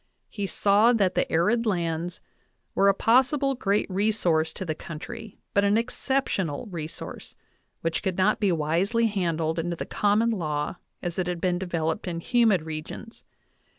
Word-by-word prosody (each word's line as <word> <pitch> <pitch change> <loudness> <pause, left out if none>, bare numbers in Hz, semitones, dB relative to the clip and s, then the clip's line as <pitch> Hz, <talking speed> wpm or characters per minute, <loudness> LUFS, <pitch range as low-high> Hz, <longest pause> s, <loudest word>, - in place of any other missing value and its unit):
He 200 -2 -3
saw 205 +5 +4
that 195 -5 +2
the - - 0
arid 215 +8 +2
lands 170 -2 -1 0.5
were 200 - +3
a - - +5
pos 250 +7 +4
1 295 - -1
sible 275 -2 0
great 200 -1 +1
resource 185 -5 +1
to 190 - -5
the 160 - -1
country, 170 +7 -8 0.2
but 200 - +3
an 200 +1 +3
exceptional 230 - -1
resource, 160 -2 -7
I - - -41 0.4
which 165 -1 -1
could 190 -1 -2
not 200 +3 +3
be 200 -3 +2
wisely 175 +9 +1
handled 165 -6 0
under 170 +1 -2
the - - -5
common 210 +3 +2
law 155 -5 -2 0.3
as 175 0 -3
ijj 180 - 0
had 175 -1 -2
been 175 0 0
developed 170 -2 -2
in 170 -2 -3
humid 220 -3 +3
regions. 160 +8 -7
185 Hz, 170 wpm, -26 LUFS, 165-215 Hz, 0.5 s, a